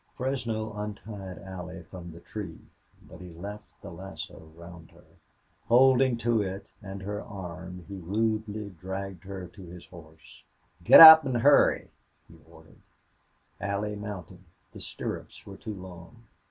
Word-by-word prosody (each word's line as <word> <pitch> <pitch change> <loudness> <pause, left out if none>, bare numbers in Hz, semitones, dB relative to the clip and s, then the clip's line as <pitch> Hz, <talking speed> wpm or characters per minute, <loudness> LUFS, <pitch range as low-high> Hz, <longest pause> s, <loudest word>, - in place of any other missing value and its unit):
Fresno 115 -5 -3
untied 105 -2 -7
Allie 90 -1 -8
from 85 0 -10
the 85 +1 -13
tree, 95 -6 -7 0.5
but - - -13
he 90 -1 -10
left 100 +5 -10
the - - -8
lasso 85 -3 -10
round 85 -1 -13
her; - - -21 0.6
holding 130 0 +5
to 115 -1 +1
it 95 0 -5 0.2
and 95 -2 -8
her 105 +1 -4
arm, 90 -4 -9
he 100 -1 -8
rudely 105 +2 -2
dragged 95 +1 -7
her 95 -2 -7
to 100 - -15
his 90 -1 -11
horse. 80 -3 -16 0.4
"Git - - +9
up, 160 -1 +13
an' 130 -2 -2
hurry," 140 +5 +4 0.4
he - - -17 0.2
ordered. - - -19 0.8
Allie 100 +2 -3
mounted. 95 -3 -8 0.3
The - - -11
stirrups - - -7
were - - -10
too 110 - -7
long. 90 +4 -12
100 Hz, 140 wpm, -27 LUFS, 90-110 Hz, 0.8 s, up